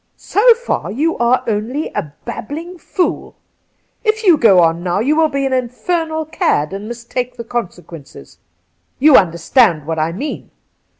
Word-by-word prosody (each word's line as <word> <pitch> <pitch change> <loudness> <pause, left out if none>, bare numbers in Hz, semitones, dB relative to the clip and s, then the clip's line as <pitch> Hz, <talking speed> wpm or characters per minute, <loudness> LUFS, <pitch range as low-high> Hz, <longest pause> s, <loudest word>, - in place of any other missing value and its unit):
' - - -48 0.2
So 460 +3 +6
far 485 +1 -3
you 310 +8 0
aye 240 +2 +2
only 230 +7 -2
a 150 - -4
babbling 335 +9 -7
fool. 360 +1 -2 0.7
If 440 0 0
you 365 -5 +6
go 215 -10 +5
on 165 0 +2
now 175 +1 -1
you 275 +8 +1
will 320 0 +4
be 275 -1 -2
an 265 - -1
infernal 315 +6 -2
cad 150 - 0
and 200 +2 -6
must 235 0 -9
take 250 0 -3
the 235 - -6
consequences. 175 - -8 0.6
You 290 +1 +5
understand 170 - +3
what 160 0 -3
I 155 +1 0
mean. 270 - -6
245 Hz, 165 wpm, -17 LUFS, -, 0.7 s, So